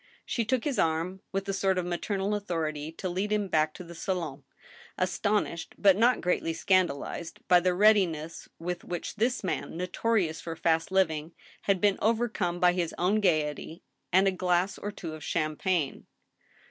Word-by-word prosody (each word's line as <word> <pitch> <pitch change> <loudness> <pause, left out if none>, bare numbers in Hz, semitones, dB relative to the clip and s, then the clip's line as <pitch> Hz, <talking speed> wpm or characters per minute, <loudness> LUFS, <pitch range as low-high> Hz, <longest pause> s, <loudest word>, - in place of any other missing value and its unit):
She 230 - -1
took 250 +2 0
his 285 -4 -1
arm, 165 +4 0
with 195 +1 -2
a 195 - -1
sort 190 -1 +1
of 180 - 0
maternal 195 +3 -1
authority, 160 -7 -2
to 185 - -4
lead 190 +4 -2
him 210 -1 +1
back 155 -3 +2
to - - -8
the 170 0 -10
sahn, 165 -5 -3 0.6
astonished, 185 -1 -1
but 195 -2 +5
not 240 +4 +3
greatly 175 -2 0
scandalized, 170 -2 0
by 180 - +7
the 180 0 +1
readiness 180 -6 +2
with 175 +1 -4
which 175 +4 -5
this 240 +3 +1
man, 180 -3 -3
notorious 180 -1 0
for 165 -1 -5
fast 165 +1 +1
living, 165 -4 +1 0.3
had 195 -2 +2
been 205 0 +2
overcome 215 -6 0
by 180 0 +5
his 175 -2 -2
own 195 +5 +2
gayety 160 -3 0 0.3
and 190 +2 +5
a - - +4
glass 185 +1 0
or 205 - -4
two 165 -5 -7
of 155 - -9
champagne. 155 0 -1
180 Hz, 170 wpm, -28 LUFS, 165-200 Hz, 0.6 s, by